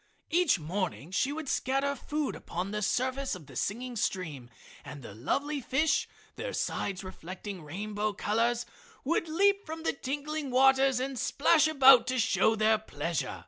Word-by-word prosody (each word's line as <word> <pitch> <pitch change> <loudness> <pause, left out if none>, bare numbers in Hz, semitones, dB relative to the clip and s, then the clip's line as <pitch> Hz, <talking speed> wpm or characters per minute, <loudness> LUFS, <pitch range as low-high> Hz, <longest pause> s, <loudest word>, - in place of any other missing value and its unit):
Each 345 - +4
morning 170 -1 -4
she 260 +8 +1
would 310 0 -5
scatter 275 +2 0
food 295 +2 -3
upon 180 +3 -5
the 210 0 -2
surface 260 +4 0
of 175 -5 -11
the 135 -2 -14
singing 240 - -3
stream 160 - -3 0.3
and 145 -3 -9
the 100 - -9
lovely 280 - -2
fish, 280 +4 +1 0.3
their - - -4
sides 195 -1 -2
reflecting 185 +1 -8
rainbow 205 +7 -3
colors, 230 +4 0 0.4
would 330 +4 0
leap 400 +5 +3
from 320 -1 -7
the - - +1
tinkling 290 +2 -4
waters 265 0 +4
and 260 -1 -3
splash 300 +4 +3
about 270 -5 +7
to 255 0 0
show 225 -1 +3
their 220 0 +3
pleasure. 165 -6 -3
250 Hz, 155 wpm, -30 LUFS, 195-280 Hz, 0.4 s, about